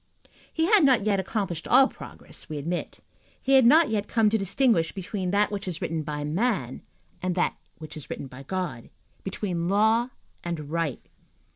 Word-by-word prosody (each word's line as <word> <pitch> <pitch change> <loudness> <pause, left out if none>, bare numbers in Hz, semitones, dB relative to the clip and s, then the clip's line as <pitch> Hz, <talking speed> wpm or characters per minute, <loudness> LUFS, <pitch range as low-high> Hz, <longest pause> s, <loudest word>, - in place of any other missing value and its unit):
He 320 - +1
had 405 -1 +5
not 255 -7 +4
yet 200 -2 +2
accomplished 190 -4 -3
all 270 - +6
progress, - - -11
we 155 - -4
admit. 170 +5 -4 0.4
He 270 - -2
had 260 -3 +7
not 315 +5 +6
yet 210 -2 -1
come 220 -2 +2
to 220 - +3
distinguish 195 -3 +2
between 190 -1 -4
that 205 +2 +2
which 200 -2 -4
is 170 -3 -4
written 165 -1 -2
by 150 -1 -4
man 160 - -1 0.4
and 180 -1 -1
that 180 - +1 0.2
which 155 -1 -9
is 155 - -9
written - - -5
by 130 0 -11
God, 175 -5 -4 0.3
between 180 -3 -3
law 220 +4 +3 0.3
and 155 -4 -5
right. 165 -5 -2
190 Hz, 175 wpm, -26 LUFS, 165-220 Hz, 0.4 s, had